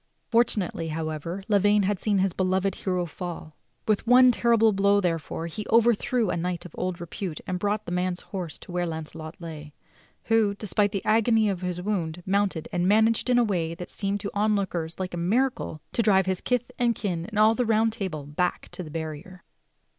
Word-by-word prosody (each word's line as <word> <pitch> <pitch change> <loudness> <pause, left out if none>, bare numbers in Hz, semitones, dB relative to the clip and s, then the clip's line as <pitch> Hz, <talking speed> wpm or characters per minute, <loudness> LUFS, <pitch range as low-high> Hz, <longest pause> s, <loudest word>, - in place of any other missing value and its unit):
Fortunately, 210 -8 +1
however, 160 +3 -4
Lavaine 205 0 +4
had 195 0 0
seen 210 -2 +1
his 190 -1 +1
beloved 190 +1 +1
hero 180 -2 -1
fall. 170 -2 -7 0.3
With 215 +1 +1
one 250 +1 +7
terrible 230 -2 +3
blow, 200 +1 +3
therefore, 165 -3 -2
he 170 +6 -5
overthrew 230 -1 +3
a - - -1
knight 175 +1 -3
of 180 - -9
old 180 -1 -3
repute 170 -1 -5
and 180 -1 -3
brought 205 +2 -1
the - - -6
man's 180 0 -1
horse 180 -6 -6
to - - -12
where 175 0 -1
Launcelot 160 0 -7
lay, 155 -3 -8 0.5
who, 220 -3 +2
despite 205 0 0
the 195 - -4
agony 220 0 +3
of 190 -2 -3
his 180 -1 -3
wound, 180 -4 -2
mounted 195 -4 0
and 175 0 0
managed 220 +4 +3
in 250 - +4
a 245 - +5
way 170 -6 -1
that 175 +1 -8
seemed 200 0 -2
to 200 - -3
the 200 - -2
onlookers 190 -6 0
like 185 -1 -3
a - - -3
miracle 215 - 0
to - - +2
drive 195 -4 +4
his 190 -1 -1
kith 250 0 -1
and 240 -1 +2
kin, 175 -5 -3
and 215 -1 -6
all 215 +1 +6
the 250 - 0
Round 225 -1 +2
Table, 185 -10 -4
back 165 +5 -2
to - - -6
the 165 - -7
barrier. 160 +3 -6
190 Hz, 200 wpm, -26 LUFS, 170-215 Hz, 0.5 s, one